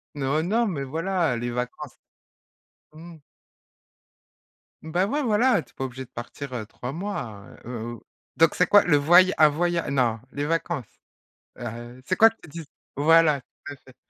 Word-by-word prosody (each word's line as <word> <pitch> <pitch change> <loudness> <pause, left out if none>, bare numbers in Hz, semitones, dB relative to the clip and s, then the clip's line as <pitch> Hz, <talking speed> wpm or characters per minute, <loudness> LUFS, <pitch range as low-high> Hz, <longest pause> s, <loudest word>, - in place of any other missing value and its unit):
Non, 140 +2 0
non, 225 +6 +1
mais 140 -7 -3
voilà, 165 -1 -1
les 120 +1 -3
vacances. 125 +1 -5 1.0
Mmh. 165 +1 -12 1.7
Bah 175 +4 0
ouais 290 +5 -1
voilà, 235 -1 +3
tu - - -25
es - - -36
pas 135 - -3
obligé 130 +1 -7
de - - -28
partir, 130 +3 -8
heu, 115 -4 -4
3 125 +4 -7
mois, 140 - -6 0.2
heu, - - -9
heu, 115 -2 -5
ou 115 - -12 0.3
donc 165 -1 +4
c'est 180 - +2
quoi 205 - +6
le 155 -4 +3
voya 175 +6 +5
un 155 - +7
voya 170 +3 -1
non 120 -5 +1
les 145 +1 -3
vacances, 165 -5 -3 0.6
heu 120 - -7
heu, 120 +2 -8
c'est 185 - 0
quoi 225 +3 +7
tu 225 -6 -17
dis 165 +1 -8 0.3
Voilà, 155 -1 +4
tout 145 +3 -12
à - - -11
fait. 130 -1 -20
155 Hz, 180 wpm, -25 LUFS, 125-175 Hz, 1.7 s, un